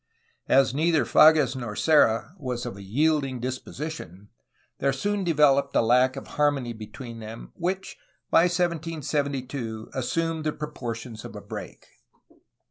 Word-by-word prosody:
As 135 -1 +4
neither 160 +2 +2
Fages 155 -4 +6
nor 120 -5 -5
Serra 150 -2 +3
was 125 -4 -4
of 120 - -5
a 100 - -10
yielding 135 +5 +1
dis 130 +1 -3
position, 105 - -8 0.5
there 140 - +2
soon 205 +7 -1
developed 145 -4 +3
a - - +5
lack 125 +3 +4
of 135 - -7
harmony 145 -5 0
between 115 +2 -9
them 110 +1 -9
which 190 +2 -3 0.3
by 165 - +6
1772 145 -9 -2
assumed 165 +5 -1
the 155 -1 -1
proportions 120 -6 -6
of - - -9
a - - -5
break. - - -8
140 Hz, 135 wpm, -26 LUFS, 120-155 Hz, 0.5 s, Fages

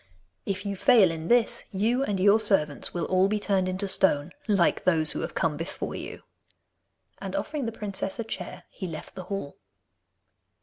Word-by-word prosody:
If 200 +1 -2
you 200 0 -2
fail 210 -4 +5
in 165 0 -5
this, 240 +1 +3
you 230 +6 +1
and 205 -7 -1
your 200 +3 +5
servants 175 -9 0
will 170 -2 -2
all 185 +1 +3
be 210 +1 0
turned 195 -2 +1
into 190 +2 -1
stone, 170 -5 +2 0.2
like 195 -5 +2
those 160 -4 +3
who - - -3
have - - -4
come 155 -3 0
before 165 +3 -5
you.' - - -7 1.0
And - - -5
offering 290 -6 -2
the - - -2
princess 200 -3 -3
a 230 - -2
chair, 185 -4 -6
he 185 - -6
left 160 -2 -8
the 185 -1 -8
hall. 185 -7 -5
190 Hz, 180 wpm, -27 LUFS, 175-210 Hz, 1.0 s, fail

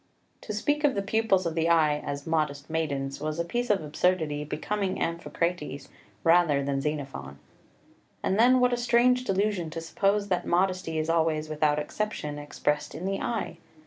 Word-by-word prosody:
To - - -6
speak 290 +8 0
of 290 -5 +3
the 200 - -1
pupils 200 -3 +2
of 165 - -1
the 165 +1 +1
eye 155 -3 +4
as 140 -1 -5
"modest 155 -2 -1
maidens" 140 -4 -2
was 155 +1 -2
a 170 - -1
piece 240 +7 -2
of 200 -5 +2
absurdity 155 -1 0
becoming 190 +6 -2
Amphicrates 170 -3 -2 0.3
rather 165 -4 +4
than 135 0 -1
Xenophon. 135 - -4 0.9
And 195 - +1
then 255 +2 +6
what 250 0 +3
a - - +1
strange 245 +1 +3
delusion 195 -4 0
to 165 - -5
suppose 200 +5 0
that 180 -2 0
modesty 180 -2 +1
is 155 0 -1
always 160 -2 +1
without 150 -1 +1
exception 150 -2 -3
expressed 150 0 -2
in 170 - -5
the 195 0 -1
eye! 235 -3 -3
165 Hz, 170 wpm, -27 LUFS, 150-200 Hz, 0.9 s, then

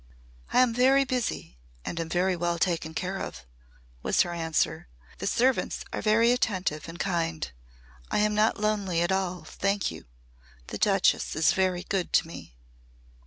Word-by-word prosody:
"I - - +5
am 250 -2 +3
very 265 +3 +4
busy 245 - -3 0.3
and 170 - -4
am 165 -1 -3
very 180 +2 +1
well 175 0 -1
taken 165 -2 -1
care 190 +1 -2
of," - - -6 0.6
was - - +2
her 175 - -5
answer. 160 - -1 0.3
"The - - -3
servants 250 +4 +1
are - - -2
very 230 +2 +4
attentive 185 -10 -1
and 165 - -8
kind. 165 - -2 0.6
I - - 0
am 210 0 +2
not 215 +1 +2
lonely 205 -5 0
at 175 - 0
all, 185 -2 -1
thank 195 - -1
you. 80 - -10 0.6
The - - -5
Duchess - - +2
is 155 +1 +4
very 185 -2 0
good 190 -1 -2
to - - +4
me." 165 - -11
185 Hz, 165 wpm, -27 LUFS, 170-210 Hz, 0.6 s, I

